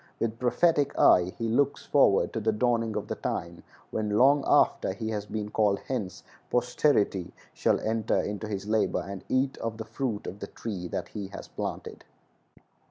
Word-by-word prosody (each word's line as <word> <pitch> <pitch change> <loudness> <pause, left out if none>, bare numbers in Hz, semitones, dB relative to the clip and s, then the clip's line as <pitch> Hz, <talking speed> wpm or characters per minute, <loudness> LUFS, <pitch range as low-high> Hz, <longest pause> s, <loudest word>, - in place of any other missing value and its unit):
With 115 0 -2
prophetic 145 +3 +2
eye 90 0 +5
he 115 - -2
looks 140 +5 +1
forward 120 -9 +3
to 115 - -1
the 110 +1 +1
dawning 115 -1 0
of - - -3
the - - -2
time 85 +1 -4 0.3
when, 105 -1 -1
long 140 +3 +5
after - - +3
he 110 - -4
has 105 -2 -3
been 105 -1 -4
called 105 -2 +2
hence, 105 -9 -4 0.3
posterity 120 - +1 0.2
shall - - +1
enter 110 -1 0
into 105 +1 -3
his 100 -2 -4
labor 110 0 +1
and 100 -1 -7
eat 130 +1 +1
of 115 -1 -4
the 110 - -6
fruit 110 -1 -3
of 100 - -6
the 100 - -6
tree 100 -6 -5
that - - -4
he 100 -3 -5
has 100 - -9
planted. - - -5
110 Hz, 175 wpm, -28 LUFS, 105-120 Hz, 0.3 s, eye